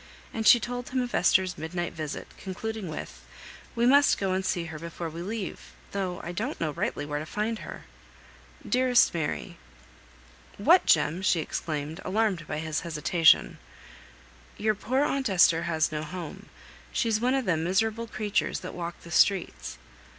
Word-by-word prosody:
And 220 -1 -1
she 240 - +9
told 245 +1 -5
him 260 - -1
of 245 -1 -4
Esther's 185 -1 +3
midnight 175 +2 -3
visit, 155 -2 -5
concluding 210 +1 -5
with, 155 - -7 0.5
"We 235 0 +2
must 280 +2 +5
go 195 -2 0
and 190 +1 0
see 175 -2 -1
her 160 -2 -7
before 170 0 -6
we 165 +2 -7
leave, 200 0 -5 0.2
though 190 -3 -3
I 175 - -4
don't 225 - -3
rightly 150 -2 -2
know - - -11
where 145 - -1
to 155 - -5
find 215 +4 -2
her." - - -9 0.8
"Dearest 250 -1 +4
Mary, 160 -3 -3 0.5
" - - -25
"What, - - +7
Jem?" 170 +5 +3
exclaimed 155 -1 -3
she, - - -6
alarmed 200 -5 0
by 150 - -3
his 155 0 -2
hesitation. 165 0 +3 1.0
"Your 215 +1 +2
poor 255 +7 0
aunt 275 -4 0
Esther 170 -3 +5
has 160 -2 +1
no 150 -1 -2
home: 165 0 -7 0.4
she's 225 -3 +1
one 250 +2 +2
of 265 -2 0
them 165 -4 +1
miserable 220 +6 0
creatures 215 0 -1
that 185 - -7
walk 170 -1 -6
the 170 - -12
streets." 165 - +2
180 Hz, 165 wpm, -27 LUFS, 160-220 Hz, 1.0 s, she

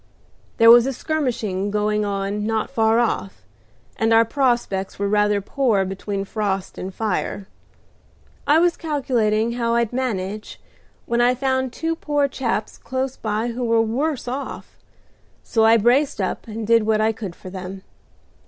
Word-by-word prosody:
There 230 0 +8
was 240 +2 +5
skirmishing 235 - -2
going 210 0 0
on 200 +1 -2
not 220 +3 -1
far 225 -3 +2
off, 225 -4 -1 0.5
and 225 0 +1
our 225 0 +6
prospects 235 -7 0
were 200 - -1
rather 210 0 +2
poor 215 -3 +1
between 195 +1 -4
frost 195 -2 -3
and 185 - -5
fire. 205 -1 -3 1.0
I 295 - +5
was 345 +1 +3
calculating 235 -8 0
how 235 -1 0
I'd 235 -1 0
manage, 215 -5 -3 0.5
when 235 0 +1
I 245 +1 +4
found 260 0 0
two 325 +5 -2
poor 290 -3 0
chaps 235 -5 -3
close 260 0 -3
by 215 +2 -2
who 245 +1 -4
were 230 -1 +2
worse 250 +6 -1
off, 265 +3 -6 0.7
so 225 -2 +2
I 225 +1 +6
braced 245 +4 +2
up 190 - -3
and 220 0 -5
did 230 +1 +4
what 220 -1 +2
I 220 +1 +3
could 205 -5 -7
for 185 - -11
them. 190 0 -7
225 Hz, 155 wpm, -22 LUFS, 210-255 Hz, 1.0 s, There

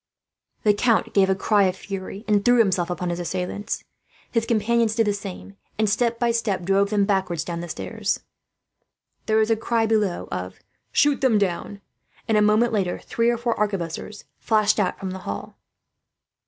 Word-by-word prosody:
The 210 - +5
count 230 +2 +1
gave 195 -1 +4
a 190 - +3
cry 205 +1 +3
of 185 -1 0
fury, 195 +2 -7
and 205 -2 +3
threw 245 +2 +5
himself 185 -6 +2
upon 180 0 -2
his 170 - -3
assailants. 180 +3 -3 0.5
His 230 -1 0
companions 230 0 +2
did 225 -1 +3
the 205 - +1
same 200 0 -8 0.2
and, 215 0 +2
step 230 +3 +1
by 235 0 +1
step, 215 -5 -1
drove 195 +2 +2
them 205 -1 +2
backward 185 -5 0
down 170 -1 -4
the 175 - -7
stairs. 210 +5 -2 1.1
There 220 -1 +3
was 220 +1 +3
a - - +5
cry 225 +1 0
below 215 -5 0
of 90 +1 -5 0.3
"Shoot 290 -1 +3
them 255 -5 +4
down!" 200 +1 -2 0.5
and, 220 - +2
a 210 - +5
moment 215 +3 +3
later, 190 -4 0
three 230 0 0
or 240 - +1
four 235 0 0
arquebuses 200 0 -3 0.2
flashed 215 -1 +2
out 195 - 0
from 190 -2 -4
the 190 - -6
hall. 100 - -6
205 Hz, 180 wpm, -23 LUFS, 190-225 Hz, 1.1 s, The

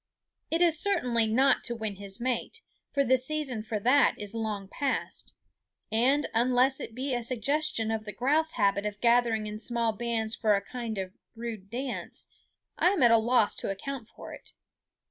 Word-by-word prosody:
It 330 +2 0
is 330 -3 +4
certainly 250 - +2
not 260 +5 +3
to 240 - -1
win 220 -3 -4
his 200 +1 -5
mate, 255 - -3 0.3
for 280 - +2
the 260 0 +3
season 265 -4 -1
for 215 0 -4
that 260 +6 +4
is 205 0 -7
long 215 -3 -3
past; 275 +6 -3 0.6
and 260 +7 +3
unless 250 +3 +3
it 225 - -7
be 265 +1 -2
a 240 - -1
suggestion 255 +1 0
of 220 -1 -3
the 210 - -5
grouse 295 - +1
habit 200 -1 +1
of 205 0 -6
gathering 235 -2 +2
in 210 0 -6
small 230 0 0
bands 225 -1 -2
for 215 -3 +2
a 200 - 0
kind 235 -3 -5
of 190 -1 -4 0.2
rude 225 -4 -7
dance, 250 +3 -5 0.5
I - - +4
am 380 -7 +1
at 240 - +7
a 230 - +6
loss 230 -1 +2
to - - -4
account 235 +4 -5
for - - -11
it. - - -12
235 Hz, 185 wpm, -28 LUFS, 220-265 Hz, 0.6 s, at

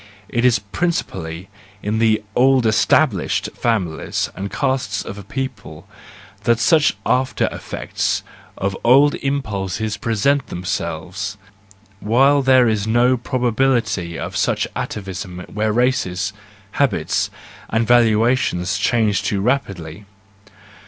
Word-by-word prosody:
— 100 - -29
It - - +2
is 125 -2 +5
principally 95 - -3 0.4
in 110 +2 -1
the 110 -2 +2
old 130 -1 +4
established 110 - +2
families 95 -9 -1
and 100 +1 -4
castes 135 -2 -1
of 100 - -7
a - - -9
people 100 - -6 0.6
that 120 -2 +4
such 155 +4 +3
after 130 0 +1
effects - - -3 0.3
of 95 0 -2
old 140 +5 +6
impulses 110 -6 -2
present 125 +5 +1
themselves, 90 +1 -4 0.6
while 135 +7 +4
there 130 -2 +5
is 110 -1 0
no 120 +3 +3
probability 120 -8 0
of - - -5
such - - +1
atavism 95 -2 -5
where 105 +1 0
races, 105 -5 0 0.4
habits, 140 +2 0 0.4
and 115 +1 +1
valuations 110 -5 +2
change 110 -1 +2
too 100 - -1
rapidly. 100 - -2
110 Hz, 110 wpm, -20 LUFS, 95-130 Hz, 0.6 s, old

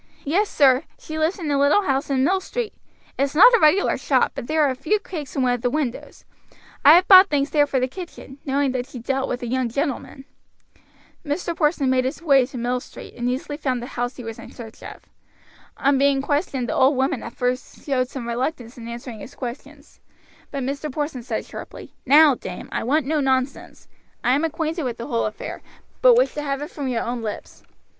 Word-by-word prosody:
"Yes, 385 +9 +1
sir; 270 0 +4
she 315 0 -7
lives 315 +4 +1
in 320 -6 -3
a 280 - +2
little 285 +9 +4
house 275 -5 -1
in 265 -2 +1
Mill 375 +7 +2
Street; 465 +3 -4 0.5
it's 275 +1 0
not 475 +10 +8
a 470 - +6
regular 340 +5 +3
shop, - - +2
but 235 - -7
there 310 0 +2
are 280 - +3
a - - -4
few 310 +11 0
cakes 320 -9 -8
in 270 - +1
one 250 -1 +2
of 245 - -3
the 245 - +1
windows; 270 -3 -4 0.6
I 295 +3 +9
have 360 +1 +4
bought 380 0 +9
things 285 -1 0
there 290 -1 +3
for 270 -2 0
the 255 - 0
kitchen, 290 -3 -10
knowing 275 -1 0
that 255 -1 -3
she 275 - -10
dealt 265 +3 -2
with 250 - -3
the 240 - -4
young 255 0 -1
gentlemen." 275 +1 -3 1.0
Mr. 330 +3 -3
Porson 300 -3 +1
made 255 -1 +2
his 265 +4 -3
way 275 -6 +4
to 265 - -9
Mill 245 +1 -1
Street - - -12
and 245 0 -2
easily 275 +3 -3
found 260 -5 -1
the 240 - -6
house 245 +1 -3
he 250 - -9
was 225 -1 -7
in - - -10
search 225 -2 -11
of. - - -10 0.7
On 275 -1 +2
being 280 0 +3
questioned 285 -4 -1
the - - -2
old 265 +1 +3
woman 265 -1 0
at 235 - -8
first 250 +1 -3
showed 255 -3 0
some 255 -4 -6
reluctance 245 0 -3
in 230 - -8
answering 235 -1 -7
his 235 - -11
questions, 285 +4 -9 0.5
but 275 -2 -4
Mr. 280 +3 -3
Porson 290 -2 -3
said 230 -2 -4
sharply: - - -10
"Now, 295 +2 +7
dame, 185 -7 -8
I - - -2
want 285 +5 +1
no 305 +2 0
nonsense; 265 -1 -2 0.4
I 250 - +3
am 285 +4 +1
acquainted 325 +1 -2
with 250 -5 -3
the 235 - -6
whole 235 -5 0
affair, 215 - -7 0.4
but - - +7
wish - - +3
to 295 - -4
have 275 -2 -2
it 300 - -8
from 285 -3 -5
your 245 -3 -1
own 240 0 -3
lips. 215 -2 -7
275 Hz, 220 wpm, -22 LUFS, 250-305 Hz, 1.0 s, I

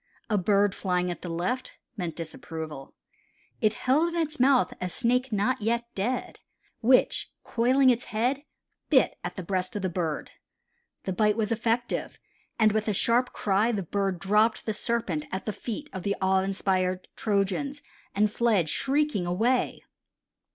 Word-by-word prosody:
A 210 - +3
bird 200 +1 +3
flying 180 -2 0
at 175 - -7
the 175 - -6
left 180 +11 -2 0.2
meant 175 -6 -4
disapproval. 160 -3 -7 0.7
It 215 -2 +3
held 315 +7 +2
in - - 0
its 315 -2 -2
mouth 260 0 +4
a 180 - -1
snake 250 +5 +1
not 220 +5 +1
yet 235 +2 0
dead, 240 +6 -2 0.4
which, 250 +2 +3
coiling 255 +3 +4
its 245 0 -1
head, 250 +6 0 0.5
bit - - +3
at - - -4
the 185 - -5
breast 185 +1 -2
of 205 - -3
the 185 - +1
bird. 165 -3 -3 0.7
The 190 - -2
bite 210 +3 +2
was 220 0 0
effective, 230 +1 -1 0.4
and 220 -2 +5
with 215 +1 -1
a 210 - +2
sharp 240 +5 +3
cry, 210 +3 +1
the 205 -4 -2
bird 195 +1 -1
dropped 210 +4 +2
the 220 - -1
serpent 205 -8 -2
at 190 - -4
the 215 - -2
feet 250 +8 -5
of 190 - -4
the 200 +2 -1
awe 190 0 +3
inspired 190 -1 0
Trojans 210 +8 -1 0.3
and 210 +1 +3
fled 210 -8 +2
shrieking 275 - 0
away. 230 +8 +1
210 Hz, 160 wpm, -27 LUFS, 185-240 Hz, 0.7 s, and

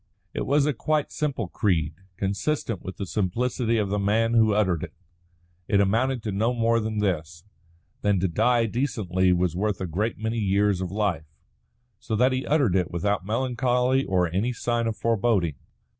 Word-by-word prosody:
It - - -3
was 140 +1 +3
a 150 - +1
quite 150 +5 -1
simple 150 -3 -2
creed, 85 -8 0 0.2
consistent 100 - -2
with 95 - -8
the 100 - -3
simplicity 115 +5 0
of 105 -3 0
the 105 +1 0
man 110 +3 +1
who 110 -2 +4
uttered 95 -6 +1
it. - - -7 0.7
It 100 - +3
amounted 115 +5 +1
to 105 - -2
no 110 +5 0
more 115 0 +2
than 110 -1 -3
this: 85 -5 -2 0.6
that 100 -2 +2
to 95 - +1
die 120 +7 +2
decently 105 -7 0
was 90 -1 +1
worth 105 +1 -1
a 95 - -2
good 105 +7 -2
many 110 +1 -2
years 100 -1 +2
of 90 - -3
life. 95 -6 -1 0.7
So 110 -1 -3
that 125 +4 +3
he 130 +1 -2
uttered 140 - +2
it 90 -3 +1
without 95 +2 -1
melancholy 125 +2 +1
or 90 -5 +1
any 110 +7 0
sign 120 0 -1
of 110 - -3
foreboding. 110 -7 +1
105 Hz, 175 wpm, -25 LUFS, 95-120 Hz, 0.7 s, who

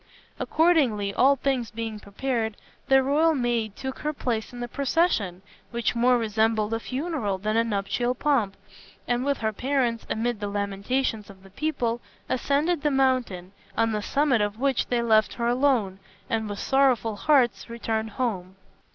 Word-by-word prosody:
Accordingly, 265 -12 +2
all 275 +3 +5
things 260 -4 -1
being 225 -1 -5
prepared, 220 +1 -3 0.3
the 270 -1 +5
royal 310 +4 +3
maid 235 -5 -1
took 265 0 -6
her 300 0 -2
place 235 -6 -2
in 245 - -9
the 240 - -3
procession, 240 - 0 0.3
which 235 -1 -1
more 245 +1 +4
resembled 220 -1 +1
a 225 - 0
funeral 255 - -2
than 215 +3 -2
a 230 - +4
nuptial 230 +3 -1
pomp, 235 -9 +1 0.5
and 245 0 0
with 280 0 0
her 220 -1 -1
parents, 250 -1 -1
amid 230 0 -1
the 205 - -3
lamentations 205 +3 -2
of 190 -1 -14
the 195 - -16
people, 240 -2 -1 0.3
ascended 290 +5 +1
the 300 - +2
mountain, 255 -10 0 0.3
on 225 0 +2
the 210 -1 -1
summit 275 0 +2
of 205 +1 -2
which 270 -1 +1
they 240 -1 0
left 220 -2 +3
her 235 - -2
alone, 240 -7 +1 0.3
and 220 -1 -1
with 205 - -4
sorrowful 255 -4 +2
hearts 250 0 +2
returned 225 -1 -2
home. 200 -5 -3
235 Hz, 160 wpm, -26 LUFS, 215-270 Hz, 0.5 s, all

